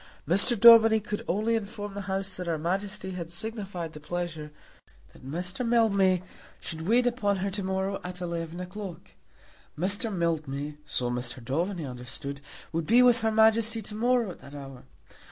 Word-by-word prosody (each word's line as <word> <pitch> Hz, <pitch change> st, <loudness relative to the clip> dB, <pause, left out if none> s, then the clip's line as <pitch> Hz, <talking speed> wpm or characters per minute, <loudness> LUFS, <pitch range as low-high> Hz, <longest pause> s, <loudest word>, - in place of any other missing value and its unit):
Mr. 200 Hz, -, +5 dB
Daubeny 225 Hz, -1 st, +9 dB
could 210 Hz, -1 st, -5 dB
only 215 Hz, +5 st, +1 dB
inform 205 Hz, -2 st, -3 dB
the 200 Hz, -, -5 dB
House 190 Hz, 0 st, -2 dB
that 180 Hz, -1 st, -6 dB
her 165 Hz, -2 st, 0 dB
Majesty 190 Hz, +4 st, -3 dB
had 175 Hz, -3 st, -6 dB
signified 190 Hz, -3 st, -4 dB
her 150 Hz, -, -9 dB
pleasure 160 Hz, -1 st, -5 dB, 0.6 s
that -, -, -17 dB
Mr. 175 Hz, -, -4 dB
Mildmay 200 Hz, -6 st, +3 dB, 0.4 s
should 160 Hz, +1 st, -6 dB
wait 240 Hz, +3 st, +4 dB
upon 220 Hz, -5 st, +1 dB
her 195 Hz, +1 st, -2 dB
to 200 Hz, +2 st, -3 dB
morrow 190 Hz, +1 st, -2 dB
at 180 Hz, 0 st, -6 dB
eleven 170 Hz, -1 st, -4 dB
o'clock. 180 Hz, -1 st, -8 dB, 0.7 s
Mr. 205 Hz, +7 st, -1 dB
Mildmay, 150 Hz, -5 st, -2 dB
so 120 Hz, -1 st, -1 dB
Mr. 120 Hz, +1 st, -3 dB
Daubeny 170 Hz, +5 st, -1 dB
understood, 135 Hz, +3 st, -7 dB, 0.3 s
would 165 Hz, -1 st, -2 dB
be 240 Hz, +3 st, +6 dB
with 245 Hz, -1 st, +5 dB
her 225 Hz, -, +2 dB
Majesty 220 Hz, +1 st, +3 dB
to 210 Hz, -, -6 dB
morrow 235 Hz, -1 st, +1 dB
at -, -, -12 dB
that 140 Hz, +1 st, -12 dB
hour. 135 Hz, -2 st, -10 dB
190 Hz, 165 wpm, -28 LUFS, 165-220 Hz, 0.7 s, Daubeny